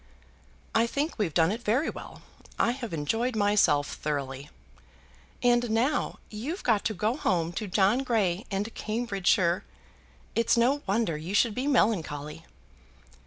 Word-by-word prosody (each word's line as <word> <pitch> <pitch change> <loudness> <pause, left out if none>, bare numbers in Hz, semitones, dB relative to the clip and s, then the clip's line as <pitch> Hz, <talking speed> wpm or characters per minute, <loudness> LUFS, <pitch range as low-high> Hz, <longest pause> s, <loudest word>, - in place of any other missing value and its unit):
"I 230 +1 +3
think 285 +3 -2
we've 195 -6 0
done 165 +3 +3
it 225 +3 -4
very 245 +8 +1
well. - - -11 0.3
I 235 - +3
have 245 -3 -6
enjoyed 225 - -1
myself 205 -9 +3
thoroughly." 140 -1 -4 0.9
"And 240 -1 +3
now 230 +6 0
you've 265 - -5
got 220 -4 +2
to 220 - 0
go 215 +6 0
home 170 - 0
to 210 +4 -4
John 195 +5 +3
Grey 215 -8 0
and 205 +3 -3
Cambridgeshire! 195 -5 0 0.7
It's 230 +1 +2
no 260 +5 +3
wonder 195 -5 0
you 170 +6 -4
should 230 0 +3
be 255 +5 -2
melancholy." 165 - 0
215 Hz, 140 wpm, -28 LUFS, 175-240 Hz, 0.9 s, I